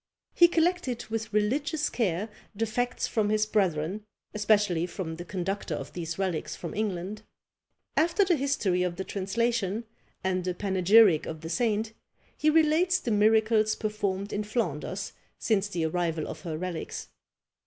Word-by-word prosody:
He 345 - +7
collected 335 -8 0
with 225 -1 -3
religious 285 +9 +1
care 200 -3 -1 0.3
the 225 +3 0
facts 245 +3 -1
from 215 -3 0
his 215 0 +2
brethren, 190 -2 0 0.3
especially 205 -5 +2
from 165 -3 -5
the 175 - -6
conductor 195 +2 -3
of - - -7
these 165 -2 -4
relics 185 -5 -2
from 170 - -6
England. 205 0 -3 0.7
After 340 +5 +3
the 360 -2 +3
history 260 - 0
of 180 -1 -1
the 190 - -4
translation, 215 +2 -1 0.4
and 185 -1 -1
a 180 - -1
panegyric 195 -2 +4
of 160 -1 -6
the 160 - -6
saint, 225 -1 0 0.4
he 310 - +2
relates 325 +4 +4
the 240 - -3
miracles 215 +1 +3
performed 205 -2 -2
in 210 - -1
Flanders 200 - -3 0.2
since 205 -3 +1
the 175 -5 -2
arrival 165 -1 -1
of - - -7
her 165 -4 -4
relics. 180 -1 -5
210 Hz, 150 wpm, -28 LUFS, 180-230 Hz, 0.7 s, He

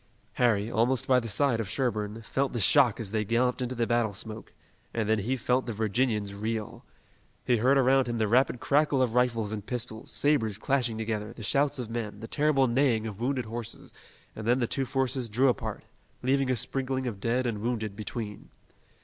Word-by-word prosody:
Harry, 110 -2 +2
almost 120 +3 +2
by 130 -1 +4
the 115 - -5
side 125 +2 +2
of 110 -4 -3
Sherburne, 110 -3 -2
felt 135 +4 -1
the 120 - -2
shock 125 +3 +4
as 105 -4 -5
they 110 -1 0
galloped 120 +4 +1
into 125 0 -2
the 120 -1 +1
battle 115 -3 +1
smoke, 110 +2 -4 0.4
and 110 -2 0
then 110 0 +2
he 125 +6 -1
felt 125 +2 0
the 115 - -2
Virginians 110 -1 0
reel. 110 +1 -4 0.6
He 125 - +3
heard 130 +5 +3
around 135 0 +4
him 120 -1 -2
the 110 -1 +1
rapid 125 +2 +3
crackle 145 0 +2
of 120 -3 -1
rifles 115 -4 +1
and 105 -2 -4
pistols, 120 -1 -3
sabers 115 -9 +1
clashing 120 -2 0
together, 110 0 -3
the 120 - -10
shouts 140 +6 +1
of 120 -3 -5
men, 110 -3 -4
the 115 - -7
terrible 145 -1 +2
neighing 120 -3 +2
of 105 -2 -6
wounded 130 0 -1
horses, 115 0 -6 0.4
and 110 0 -6
then 120 +1 +4
the 125 - +1
two 135 +3 -1
forces 130 -2 -1
drew 130 +5 +3
apart, 125 - -3 0.4
leaving 135 +1 +2
a 130 - +2
sprinkling 130 +1 -2
of 110 -6 -4
dead 120 +5 0
and 110 -4 -2
wounded 110 -3 -2
between. 105 0 -6
120 Hz, 200 wpm, -28 LUFS, 110-130 Hz, 0.6 s, by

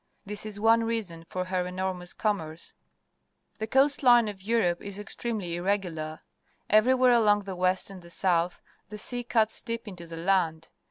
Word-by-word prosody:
This 210 +1 -4
is 205 -1 -3
one 225 +1 +4
reason 205 -8 -3
for 185 0 -3
her 185 -1 -1
enormous 180 -1 -4
commerce. 165 -7 -3 0.9
The 220 - -3
coast 270 +4 +3
line 240 -4 +6
of 200 -2 -6
Europe 195 -5 +1
is 200 -1 -6
extremely 205 -4 -4
irregular. 175 -5 -2 0.5
Ever^'^vhere 250 +3 +5
along 210 -3 +4
the 195 -1 -6
west 185 +2 0
and 190 -2 -10
the 170 - -14
south 175 -1 0 0.3
the 210 - -7
sea 245 +3 -4
cuts 225 -2 +1
deep 230 0 -5
into 175 -4 -9
the 165 0 -8
land. 165 -3 0
195 Hz, 165 wpm, -28 LUFS, 180-225 Hz, 0.9 s, line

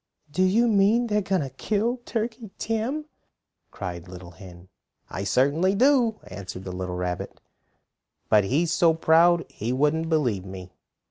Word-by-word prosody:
"Do 185 - -1
you 210 +6 +3
mean 215 +3 +3
they 210 -3 0
are - - +2
going 190 -4 0
to 135 - -6
kill 220 - -1
Turkey 225 -1 -4
Tim?" 230 +8 -2 0.6
cried 85 -1 -6
the 90 - -13
little 90 -1 -10
hen. 90 +1 -13 0.4
"I 95 - -4
certainly 145 - +2
do," 245 -2 +3
answered 95 -1 -8
the 95 - -6
little 90 0 -4
rabbit. 90 -1 -4 0.9
"But 105 -2 +4
he's 155 - +1
so 165 -2 +3
proud 165 +1 +4
he 115 +4 -5
wouldn't 150 +5 +1
believe 125 - 0
me. 95 -1 -9
160 Hz, 155 wpm, -25 LUFS, -, 0.9 s, But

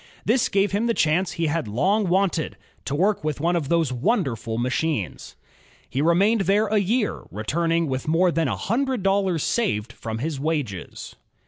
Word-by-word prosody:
This 230 +3 +2
gave 200 +1 +2
him 210 +4 0
the 230 - +1
chance 175 +3 +1
he 165 -1 -1
had 160 -4 -1
long 190 - +1
wanted, 175 - 0 0.3
to 140 - -2
work 195 +3 +1
with 155 -2 -2
one 170 +4 +1
of 155 -5 -2
those 165 -6 +1
wonderful 125 - -1
machmes. 125 - -2 0.5
He 135 - -2
remained 195 +7 +3
there 205 +2 +4
a 215 0 +2
year, 210 +3 -1
returning 165 +10 0
with 130 -2 -3
more 170 +3 +3
than 165 -2 0
a 110 -7 -2
himdred 245 - -1
dollars 195 -4 +1
saved 120 - -1
from 110 -2 -5
his 145 +3 -3
wages. 140 - -4
165 Hz, 170 wpm, -24 LUFS, 135-200 Hz, 0.5 s, there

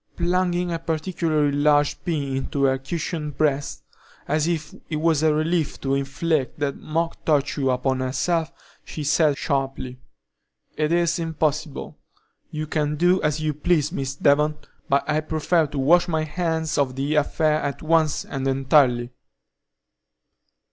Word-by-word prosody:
Plunging 175 0 0
a 165 - -2
particularly 160 -2 0
large 145 0 +2
pin 145 -6 -2
into 135 +1 -2
her 135 -1 +3
cushioned 150 0 -4
breast, 145 -2 0 0.4
as 155 +1 +1
if 160 -3 -2 0.2
it 155 - -2
was 155 -1 +2
a 160 -1 +4
relief 155 +1 0
to 135 0 -1
inflict 140 +1 -1
that 145 -2 -1
mock 165 +2 -3
torture 145 -2 +1
upon 130 +1 0
herself, 155 +6 0 0.3
she 155 - -6
said 150 0 +3
sharply: 135 -3 -2 0.8
"It 155 0 0
is 170 0 +2
impossible. 155 -2 -2 0.5
You 155 0 -4
can 150 -1 -1
do 175 +4 +3
as 150 0 0
you 155 -1 0
please, 150 +1 +1
Miss 135 -6 -3
Devon, 150 +2 +3 0.3
but 140 +1 +2
I 150 0 +1
prefer 155 +1 +1
to 145 - -7
wash 175 +6 +4
my 160 -2 0
hands 160 -1 -1
of 130 -3 0
the 140 +3 -1
affair 155 +1 +2
at 140 +2 -4
once 160 -1 +2
and 135 -1 -3
entirely." 130 -3 +3
150 Hz, 145 wpm, -23 LUFS, 140-160 Hz, 0.8 s, a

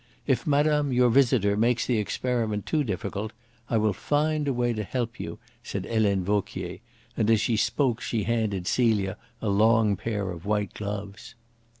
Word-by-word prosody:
If - - 0
madame, 150 0 +2
your 125 -1 +4
visitor, 115 -6 +3
makes 120 +3 +2
the 120 -4 +1
experiment 110 -1 -1
too 155 -2 +1
difficult, 105 -1 -4 0.4
I 115 - +2
will 105 -1 +2
find 150 - 0
a - - +2
way 120 -1 0
to 110 - -3
help 120 +2 -3
you," - - -5 0.2
said 100 -4 -5
Helene 105 -4 +1
Vauquier, 95 -1 -2 0.4
and 110 -1 +1
as 110 -1 +5
she 115 - +1
spoke 120 +2 +1
she 110 -3 -1
handed 105 -5 -1
Celia 105 -4 +1 0.3
a 110 - 0
long 110 +1 +4
pair 105 -1 -3
of 85 -2 -8
white 105 -1 -1
gloves. 105 +2 -6
110 Hz, 170 wpm, -26 LUFS, 100-120 Hz, 0.4 s, as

